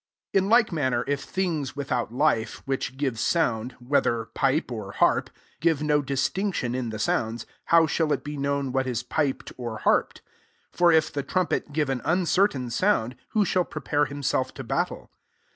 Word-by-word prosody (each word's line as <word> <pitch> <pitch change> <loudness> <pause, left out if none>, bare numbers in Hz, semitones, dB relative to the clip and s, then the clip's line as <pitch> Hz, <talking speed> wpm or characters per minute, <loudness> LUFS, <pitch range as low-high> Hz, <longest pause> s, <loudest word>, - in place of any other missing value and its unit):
7 190 -1 +3
In - - -2
like 230 -2 +5
manner 130 -7 0
if 140 -1 -1
things 160 -9 -2
without 130 -5 -2
life, 120 -4 0
vrhich 135 -1 -2
give 135 -5 -1
sound, 125 -7 0
whether 120 -3 0
pipe 135 +6 0
w 110 -5 -5
harp, - - +2 0.3
give 160 -2 +1
no 150 -1 +3
distinction 140 +1 -1
in 125 -2 -2
the 110 - -5
sounds, 110 +2 -1 0.2
how 165 -1 +5
shall 155 0 0
it - - 0
be 150 0 -5
tuiown 140 -1 -1
what 130 0 0
is 125 -1 -2
piped 140 +2 -2
or 120 -3 -5
harped? - - +1 0.5
8 - - -26
For 175 -1 +6
if 160 -1 +3
the 145 - -1
trumpet 180 -2 -1
give 145 -2 0
an 130 -2 -2
uncertain 175 - +1
sound, 125 - +1 0.2
who 215 -2 +3
shall 185 -1 +2
pre - - -8
pare 145 -1 +2
himself 140 -2 -1
to - - -6
battle? - - -2
140 Hz, 180 wpm, -26 LUFS, 125-160 Hz, 0.5 s, For